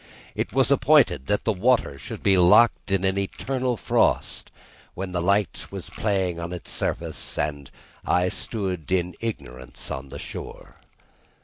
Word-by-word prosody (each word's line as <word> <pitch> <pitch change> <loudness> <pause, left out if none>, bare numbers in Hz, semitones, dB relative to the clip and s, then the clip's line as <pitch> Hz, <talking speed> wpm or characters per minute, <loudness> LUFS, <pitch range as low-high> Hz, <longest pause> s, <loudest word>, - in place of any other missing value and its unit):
It - - -2
was 135 +4 +2
appointed 120 - +4
that 105 - +1
the 110 - +1
water 100 - +1
should - - -8
be 100 - +5
locked 90 +7 +5
in 95 -1 +1
an 95 0 +1
eternal 125 +5 -2
frost, - - +1 0.5
when 95 0 -4
the 90 -1 -1
light 100 +2 +1
was - - -7
playing 95 -5 -1
on 85 +1 -5
its 90 - -7
surface, - - -3
and 70 -3 -2 0.3
I 90 +1 +2
stood 95 -6 -4
in 90 -1 +1
ignorance 65 - -6
on 65 +1 -5
the - - -7
shore. - - -9
95 Hz, 150 wpm, -25 LUFS, 85-110 Hz, 0.5 s, be